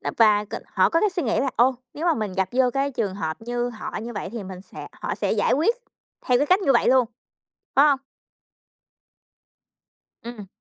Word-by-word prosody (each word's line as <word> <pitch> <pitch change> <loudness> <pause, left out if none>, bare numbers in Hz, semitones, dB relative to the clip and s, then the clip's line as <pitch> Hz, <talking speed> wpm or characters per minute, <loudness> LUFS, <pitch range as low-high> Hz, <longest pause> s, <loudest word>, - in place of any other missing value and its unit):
nó, - - -3
và 210 -2 +5
c - - -22 0.3
họ - - +4
có 330 - +2
cái 425 - +2
suy 360 -2 -2
nghĩ 225 - 0
là, 270 - 0
ô, 255 +3 +4 0.2
nếu 320 +4 -3
mà 335 - +4
mình 215 -6 -3
gặp 190 0 0
vô 255 0 +3
cái 275 +1 0
trường 225 -8 -2
hợp 160 -5 -3
như 240 +1 -2
họ 225 -3 -7
như 235 +1 -6
vậy 205 - -5
thì 230 - -5
mình 185 -1 -8
sẽ - - -10
họ - - -4
sẽ - - -1
giải - - +1
quyết 335 - +3 0.5
theo 250 -1 +4
cái 290 - +1
cách 370 +2 +4
như 275 -7 +3
vậy 235 - +3
luôn, 255 -1 +4 0.7
phải 280 - +6
hông? 275 -2 +2 2.2
Ừm. 230 -4 -8
245 Hz, 215 wpm, -24 LUFS, 215-275 Hz, 2.2 s, phải